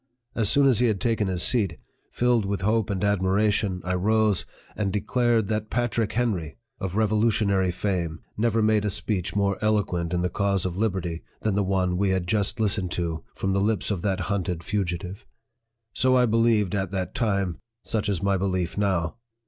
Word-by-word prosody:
As 110 -3 +1
soon 140 0 +4
as 130 -5 +4
he 125 - +4
had 105 -4 0
taken 115 -4 0
his 90 -2 0
seat, 100 -9 +1 0.3
filled 120 -2 +2
with 100 0 -2
hope 110 +2 +1
and 100 -1 -2
admiration, 100 -1 +1
I 90 - -1
rose, 105 +1 +2 0.3
and 100 -2 -1
declared 115 +1 +1
that 110 0 -2
PATRICK 115 -2 0
HENRY, 100 -10 -1 0.2
of 95 -1 -4
revolutionary 105 -3 +2
fame, 90 -3 -2
never 115 0 +1
made 110 -1 +3
a 105 - 0
speech 100 -2 -2
more 100 -1 +1
eloquent 100 -6 0
in 90 0 0
the 90 - +1
cause 100 -2 0
of 90 -2 -2
liberty, 95 -5 -1 0.2
than 110 - 0
the 100 - +1
one 95 -2 0
we 100 +1 +1
had 95 -2 0
just 100 +3 0
listened 105 -3 +1
to 85 -2 -3
from 95 0 -1
the 100 - +1
lips 105 +1 0
of 95 -4 -2
that 95 -1 -1
hunted 90 -4 -2
fugi 90 -2 -1
tive. 95 +6 -9 0.7
So 130 0 +3
I 125 -1 +5
believed 115 -4 +2
at 95 -2 -1
that 95 -1 -3
time 100 -6 0 0.2
such 105 -2 -1
is 100 -2 -1
my 100 -1 +2
belief 95 -1 -1
now. 95 -2 0
100 Hz, 190 wpm, -25 LUFS, 90-110 Hz, 0.7 s, I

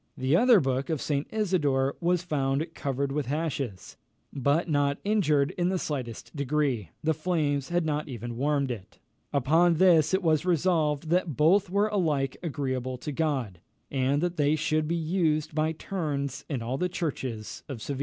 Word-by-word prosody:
the 130 +4 +2
other 240 +2 +6
book 135 -1 -1
of 160 -3 0
St. 145 +1 -1
Isidore 150 -11 +1
was 175 0 +1
found 140 -3 0
covered 140 -1 -2
with 140 -2 -2
ashes, 140 - -3 0.4
but 140 +5 +1
not 145 -2 +1
injured 155 -10 +2
in 175 0 +2
the 190 - 0
slightest 130 -5 -5
degree. 140 - 0
The 160 +1 +2
flames 150 -4 -1
had 175 -1 +1
not 150 0 -1
even 120 -1 -6
warmed 140 +1 0
it. 105 -3 -8 0.3
Upon 160 +5 +3
this 165 -3 +5
it 190 - -1
was 155 -3 +3
resolved, 160 -4 +1
that 175 -5 +1
both 185 +6 +4
were 200 +3 +2
alike 155 -10 0
agreeable 130 -5 -3
to 135 +4 -5
God, 135 - -1 0.3
and 140 +3 +1
that 175 0 -1
they 145 0 +3
should 155 0 0
be 170 - 0
used 160 -2 0
by 155 +1 +1
turns 150 -5 -3
in 130 -6 -2
all 125 +4 -3
the 180 - 0
churches 130 - -4
of 135 -5 -5
Seville. 135 +4 -4
150 Hz, 170 wpm, -27 LUFS, 135-170 Hz, 0.4 s, other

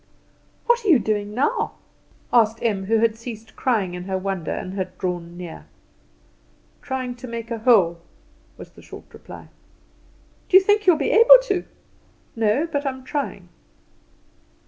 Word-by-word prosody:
"What 480 0 +2
are - - -4
you 335 -7 +6
doing 210 -2 -2
now?" 265 +4 -1 0.6
asked 225 -2 +4
Em, 200 -4 -1
who 225 +3 +2
had 220 0 +2
ceased 225 -1 -10
crying 215 -9 -1
in 180 0 -7
her 190 0 -2
wonder, 190 -3 -4
and 185 - -4
had 185 -2 -5
drawn 175 -2 -4
near. 175 -3 -9 1.1
"Trying 265 -3 -4
to 255 +1 -9
make 230 0 -7
a 230 - -3
hole," 200 -8 +3 0.6
was - - -12
the - - -17
short - - -12
reply. - - -12 1.0
"Do 375 - +8
you 380 - +5
think 410 0 +2
you 360 - +8
will 315 - -3
be 280 - 0
able 465 +3 +9
to?" 395 -7 -2 0.7
"No; 225 +6 +1
but 290 -4 -3
I 275 - 0
am 260 -1 -9
trying." 285 +2 -5
230 Hz, 165 wpm, -22 LUFS, 195-285 Hz, 1.1 s, able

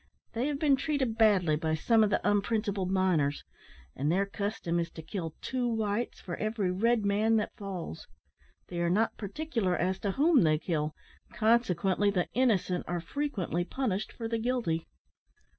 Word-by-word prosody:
They 235 +4 0
have 295 -1 -1
been 285 -1 +4
treated 270 -6 -1
badly 200 -8 +4
by 160 0 0
some 220 +8 +3
of 210 - +2
the 205 - 0
unprincipled 205 -2 0
miners; 180 -7 +1 0.5
and 145 +4 0
their 195 +3 +2
custom 200 -4 -2
is 170 0 -2
to 160 - -8
kill 165 -1 -5
two 255 -2 -1
whites 220 0 -1
for 175 - -5
every 215 -3 -1
red 220 +3 +2
man 210 +3 +3
that 215 - -1
falls. 185 - -6 0.6
They 175 - -4
are 170 - +1
not 215 +6 +1
particular 210 - -2
as 185 +2 0
to 200 -2 -1
whom 305 - +4
they 155 -3 +4
kill, 155 -2 -2 0.4
consequently 205 -4 +2
the 185 -3 0
innocent 205 -8 +1
are 175 0 -1
frequently 185 - -2
punished 215 -1 -2
for 225 - -5
the 230 0 -1
guilty." 225 -9 -1
200 Hz, 165 wpm, -30 LUFS, 175-230 Hz, 0.6 s, been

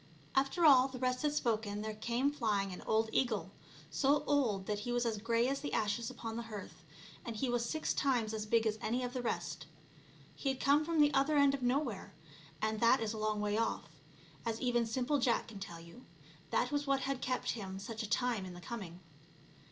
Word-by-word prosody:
After 275 +6 +2
all 265 -3 +8
the 260 -1 -8
rest 255 0 0
had 300 -1 +2
spoken 220 -7 -1
there 215 0 -3
came 240 +6 0
flying 205 -8 0
an - - -8
old 220 +1 +2
eagle, 215 -8 0 0.4
so 275 - +2
old 235 -10 +1
that 210 0 -2
he 240 +4 -4
was 245 0 +1
as 225 -3 -1
grey 230 +2 +2
as 275 +1 -1
the 290 - -4
ashes 220 +3 0
upon 230 -3 -6
the - - -2
hearth, 210 -3 -8 0.4
and 230 - -5
he 255 +4 -1
was 240 -1 +1
six 315 0 -1
times 245 -6 +1
as 215 -1 -3
big 225 +1 +3
as 215 0 0
any 245 +3 -1
of 245 0 -3
the 255 - -2
rest. 240 - -3 0.7
He 275 - -2
had 265 - -2
come 285 +2 +4
from 325 -1 +2
the 295 0 +5
other 280 +2 +3
end 280 -1 +5
of 275 - -3
nowhere, 260 +5 -1 0.5
and 220 0 0
that 235 +3 +5
is 225 -1 -2
a 220 - -5
long 215 -1 0
way 210 +1 0
off, 230 - -1 0.5
as 230 -1 -2
even 240 -2 +1
simple 260 +5 0
Jack 245 -2 +1
can 210 -3 -9
tell 175 -4 -7
you; 170 +10 -13 0.5
that 245 - +1
was 290 0 -1
what 275 -1 +2
had 270 -1 -2
kept 255 0 -1
him 190 -4 -5
such 215 +3 -5
a 220 - -5
time 245 -5 +1
in 180 -1 -8
the - - -9
coming. 180 -2 -7
235 Hz, 220 wpm, -34 LUFS, 215-270 Hz, 0.7 s, all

